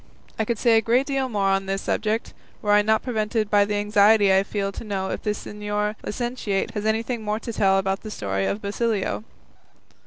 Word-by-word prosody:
I 220 - +1
could 235 0 -1
say 230 0 +4
a - - +4
great 240 +4 +2
deal 270 -2 -1
more 200 -4 +1
on 195 0 +1
this 195 0 -2
subject, 220 +1 -1 0.3
were 210 - +1
I 205 0 +6
not 220 +1 +2
prevented 215 -3 -1
by 205 -1 +5
the 205 0 -2
anxiety 205 -1 +4
I 190 - +5
feel 195 0 -2
to - - -8
know 195 -3 -3
if - - -4
the 215 - -2
señor 210 0 -2
licentiate 240 -3 -2
has 210 -1 -3
anything 225 +2 -1
more 210 0 -2
to 230 0 -6
tell 195 -2 +3
about 195 0 -1
the 215 - -7
story 95 - -2
of 210 - -3
Basilio." 210 0 -1
210 Hz, 210 wpm, -24 LUFS, 200-225 Hz, 0.3 s, I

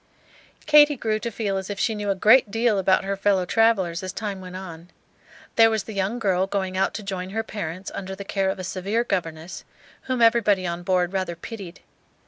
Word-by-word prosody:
Katy 295 -1 +6
grew 215 -2 -1
to 235 - -3
feel 205 -3 -2
as 190 0 -5
if 205 - -4
she 225 - +1
knew 210 -1 -3
a 195 - +1
great 220 +4 +5
deal 225 -1 +1
about 190 +1 +3
her 195 +1 -2
fellow 195 -2 +1
travellers 195 -5 +2
as 185 -1 -5
time 200 -3 -5
went 185 0 -9
on. 175 -2 -9 0.7
There 225 0 +7
was 220 -2 -1
the 220 - -8
young 200 +4 -1
girl 190 -4 +1
going 190 -2 -2
out 190 +1 0
to 215 - -5
join 190 -2 -4
her 220 +3 -2
parents 185 -4 -6
under 190 -1 -6
the 200 0 -8
care 195 -1 0
of - - -2
a 185 - -6
severe 195 +5 -1
governess, 170 -5 -4 0.5
whom 255 -1 0
everybody 215 -5 +3
on 170 0 -3
board 180 0 0
rather 185 -3 -2
pitied. 185 -1 -9
195 Hz, 210 wpm, -24 LUFS, 185-220 Hz, 0.7 s, There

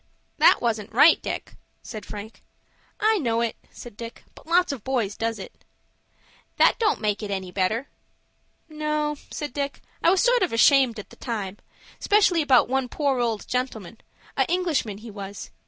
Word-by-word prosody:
"That - - +6
wasn't 225 -2 -1
right, 290 +8 +6
Dick," - - -5 0.3
said 215 -3 -8
Frank. 210 +1 -9 0.6
"I 435 0 +3
know 230 -6 0
it," 235 -1 -1
said 240 -4 -11
Dick; 230 +1 -9
"but - - -17
lots 350 0 +3
of 260 -7 -6
boys 240 -7 -1
does 225 0 -2
it." 190 - -11 0.9
"That - - +4
don't 430 -3 +2
make 210 -1 0
it 210 - -5
any 190 -2 -4
better." 215 +8 0 0.8
"No," 300 -1 -2
said 295 -4 -5
Dick, 280 -1 -3 0.2
"I - - +4
was 375 +1 +3
sort - - +4
of 365 - +1
ashamed 250 0 +4
at 210 - -9
the - - -15
time, 205 -5 -4 0.4
'specially 395 -5 +3
about 265 -5 +4
one 265 0 -1
poor 280 -3 0
old 230 -3 -1
gentleman,—a 230 -5 -4
Englishman 330 - 0
he 220 +1 -10
was. 200 -1 -8
240 Hz, 165 wpm, -25 LUFS, 215-300 Hz, 0.9 s, That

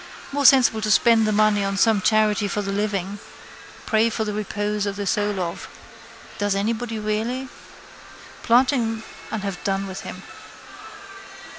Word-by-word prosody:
More 285 0 -1
sensible 245 -5 +5
to 215 - -1
spend 225 0 +4
the - - +1
money 210 -1 +3
on 195 0 -2
some 215 -1 +3
charity 215 0 +2
for 205 +1 -2
the 195 - -3
living. 200 -1 -2 0.7
Pray 220 +1 +2
for 220 - -2
the 210 - -3
repose 210 0 -2
of 200 - -3
the 205 0 -4
soul 205 -1 0
of. 170 -2 -5 0.7
Does 205 -1 0
anybody 225 +3 -2
really? 220 +5 -2 0.9
Plant 250 +4 +4
him 225 -4 -2 0.3
and 215 -2 -4
have 195 -3 -5
done 195 0 -1
with 190 -1 -7
him. - - -9
210 Hz, 155 wpm, -22 LUFS, 200-225 Hz, 0.9 s, sensible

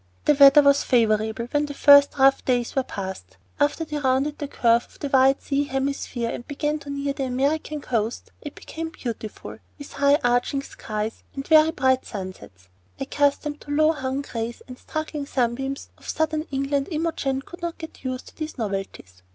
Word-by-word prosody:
The 300 - +5
weather 280 +1 +8
was 280 0 +5
favorable 220 -1 +1
when 295 0 +1
the 285 - -7
first 285 +1 +6
rough 270 0 +4
days 245 -2 0
were 270 - +3
past, 190 -6 -7 0.2
and 290 0 +5
after 325 +2 -6
they 300 -1 -4
rounded 270 +2 0
the 290 - -3
curve 235 -3 +2
of - - -21
the 285 - -4
wide 270 0 +4
sea 285 0 0
hemisphere 270 -3 -2
and 240 - -7
began 295 +1 -2
to 285 -1 -11
near 280 0 -2
the 275 -1 -3
American 285 +4 -1
coast 230 -3 -2
it 295 - -8
became 325 0 -6
beautiful, 230 -7 -7 0.2
with 285 - -10
high 280 0 +4
arching 245 +3 +1
skies 215 -3 -5
and 275 0 -5
very 315 0 +6
bright 260 -4 +1
sunsets. 185 - -9 0.3
Accustomed 285 +2 0
to - - -16
the 290 - -1
low 310 +1 +5
hung 270 -2 -3
grays 230 -3 -5
and 255 - -9
struggling 310 -2 -5
sunbeams 270 +1 -2
of - - -11
southern 315 0 -1
England, 275 0 -1
Imogen 305 -5 -2
could 350 - -12
not 340 -1 -4
get 320 -4 -10
used 255 -1 -4
to - - -23
these 310 -1 -6
novelties. 195 - -5
275 Hz, 185 wpm, -24 LUFS, 245-295 Hz, 0.3 s, weather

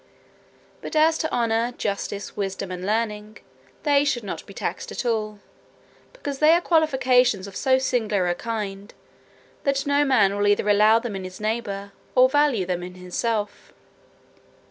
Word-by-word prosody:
But - - -7
as 315 +1 +4
to 315 - -2
honour, 230 0 0
justice, 200 0 -4
wisdom, 195 -2 -4
and 180 0 -6
learning, 215 0 -2 0.5
they 285 -2 +4
should 260 -5 -1
not 200 - -6
be - - -11
taxed - - -4
at - - -4
all; 215 -3 -1 0.7
because 285 - -6
they 310 +1 +6
are 340 - +4
qualifications 255 - +2
of 200 -2 -10
so 260 +3 +3
singular 220 -8 0
a 175 - +1
kind, 205 -1 -5 0.7
that 275 0 0
no 285 0 +3
man 220 -8 +3
will 205 0 +1
either 205 0 +2
allow 210 +2 +5
them 230 -3 -4
in 190 - -5
his 185 0 -9
neighbour 210 -2 -3 0.2
or 255 0 +7
value 280 -7 +2
them 180 -1 -2
in 180 +1 -8
himself. 205 +4 -3
220 Hz, 160 wpm, -24 LUFS, 200-265 Hz, 0.7 s, or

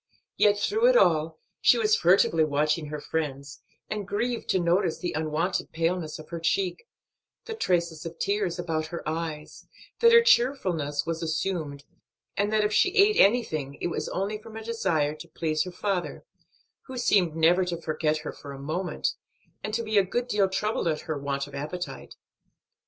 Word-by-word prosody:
Yet 205 -1 +4
through 435 - +2
it - - +6
all 160 - +3 0.2
she 245 - +6
was 215 -2 +3
furtively 170 -2 +4
watching 150 +1 0
her 150 0 -5
friends, 140 -3 -4 0.3
and 210 -2 -4
grieved 230 +4 -2
to - - +3
notice 175 0 +1
the 175 - -4
unwonted 155 +4 -1
paleness 165 -1 -1
of 155 - -12
her 170 - -5
cheek, 180 - -1 0.6
the 450 - -5
traces 170 - -1
of 165 0 -7
tears 200 -3 -1
about 160 -3 -2
her 170 -1 -7
eyes, 160 -1 -5 0.3
that 465 0 +6
her 465 0 +8
cheerfulness 190 - +2
was 165 0 -3
assumed, 160 -3 -2 0.5
and 205 +1 0
that 215 -1 +2
if 210 0 0
she 375 - +4
ate 415 +1 +5
anything 155 - +2
it - - -2
was - - -3
only 205 +3 -2
from 220 0 -10
a 225 - -7
desire 180 -10 0
to 155 +2 -11
please 155 -1 -1
her 180 - -6
father, 185 0 -3 0.6
who 260 -1 -7
seemed 185 -9 +2
never 170 +3 +4
to 175 -2 -3
forget 155 -1 -1
her - - -3
for 140 -1 -10
a 135 - -9
moment, 165 +6 -2 0.5
and 215 - -3
to 230 - -1
be 215 -2 +2
a - - +4
good 240 +6 -2
deal 205 -5 +2
troubled 200 0 -1
at 155 -2 0
her 155 - -4
want 140 -1 -3
of 145 - -14
appetite. 155 +6 -6
175 Hz, 180 wpm, -27 LUFS, 155-210 Hz, 0.6 s, her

